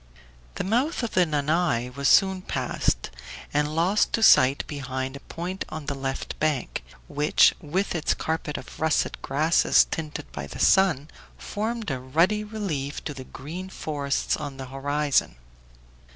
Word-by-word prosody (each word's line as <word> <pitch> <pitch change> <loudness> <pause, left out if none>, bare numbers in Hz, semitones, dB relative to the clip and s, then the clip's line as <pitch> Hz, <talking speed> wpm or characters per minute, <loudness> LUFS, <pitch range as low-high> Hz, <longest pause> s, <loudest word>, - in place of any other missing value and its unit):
The - - -2
mouth 245 - 0
of 235 - -2
the 180 -2 +3
Nanay 150 -4 0
was 140 0 +1
soon 190 -1 +4
passed, - - -1 0.4
and 150 +1 0
lost 180 +6 +2
to 225 - +1
sight 135 -7 +6
behind 130 -2 -4
a - - -7
point 180 +5 -5
on 155 -2 -6
the 140 - -2
left 135 -1 -4
bank, 150 - -1 0.2
which, 150 +2 +4
with 185 +7 -1
its 165 -3 0
carpet 160 -2 -3
of - - -10
russet 160 -1 0
grasses 155 +5 +3
tinted 155 -2 -5
by 70 -1 -6
the - - -9
sun, 180 -7 +4 0.3
formed 220 -2 -3
a 130 - -2
ruddy 165 +11 +2
relief 190 -10 -4
to 150 - -4
the 130 -2 -9
green 170 +10 -7
forests 145 -6 -1
on 145 -3 -6
the 135 - -6
horizon. 145 - 0
150 Hz, 150 wpm, -25 LUFS, 140-185 Hz, 0.4 s, sight